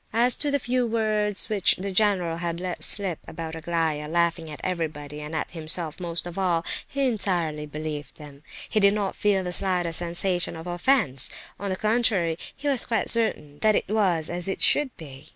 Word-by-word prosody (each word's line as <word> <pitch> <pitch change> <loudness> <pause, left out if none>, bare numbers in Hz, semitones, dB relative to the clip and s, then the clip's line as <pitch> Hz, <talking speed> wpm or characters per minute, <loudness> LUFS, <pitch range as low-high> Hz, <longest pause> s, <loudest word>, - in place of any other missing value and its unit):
As 240 +2 +4
to 295 - 0
the 285 - +2
few 250 -2 0
words 215 -3 +1
which 205 -4 +3
the 195 +1 -5
general 185 -5 +2
had 170 0 -3
let 180 -1 -4
slip 195 -6 +3
about 160 -1 -6
Aglaya 160 -2 -1
laughing 170 0 0
at 150 -2 -8
everybody, 150 -4 -4
and 150 +2 -6
at 155 - -3
himself 160 0 +1
most 170 -1 -3
of 175 +2 -6
all—he 185 +9 -1
entirely 175 -10 -1
believed 150 0 -6
them. 145 -2 -12 0.3
He 215 - +1
did 200 0 +5
not 200 -2 -2
feel 200 -2 +1
the 180 - -3
slightest 180 -3 0
sensation 175 +1 0
of 160 +1 -8
offence; 175 - +2 0.3
on 200 - -3
the 185 - -1
contrary, 210 -6 +1 0.2
he 290 - -6
was 275 -4 +2
quite 230 -2 0
certain 150 -11 -1
that 215 -1 +3
it - - 0
was 185 -7 +1
as 175 +1 0
it 195 - -2
should 295 -2 +5
be. 140 -6 -11
175 Hz, 190 wpm, -25 LUFS, 160-210 Hz, 0.3 s, did